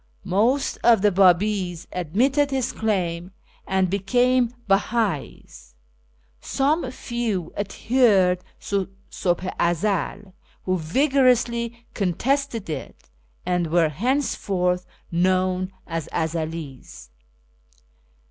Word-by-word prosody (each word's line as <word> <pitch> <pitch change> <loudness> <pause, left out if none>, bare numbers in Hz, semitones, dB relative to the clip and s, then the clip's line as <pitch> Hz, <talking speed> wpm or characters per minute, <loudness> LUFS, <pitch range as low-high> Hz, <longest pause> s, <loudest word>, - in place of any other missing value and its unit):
Most 225 +9 +1
of 230 -4 +5
the 210 - +5
Babis 185 -1 +2
admitted 255 - +1
his 265 -3 -1
claim, 180 -5 -1 0.4
and 190 -1 +2
became 245 +6 +2 0.2
Beha'is; 195 - -1 0.6
some 275 - 0
few 235 -8 -3
adhered 200 -4 +2 0.2
to 195 -2 -2 0.2
SuIih 180 0 -1
i 170 - +3
Ezel, 195 +2 -2 0.3
who 185 -1 0
vigorously 235 - +1
contested 230 +4 -1
it, 110 - -7 0.3
and 180 -1 0
were 165 0 +3
henceforth 180 - 0 0.2
known 185 +1 +1
as 165 -3 -4
Ezelis. 155 - -4
190 Hz, 90 wpm, -23 LUFS, 175-235 Hz, 0.6 s, of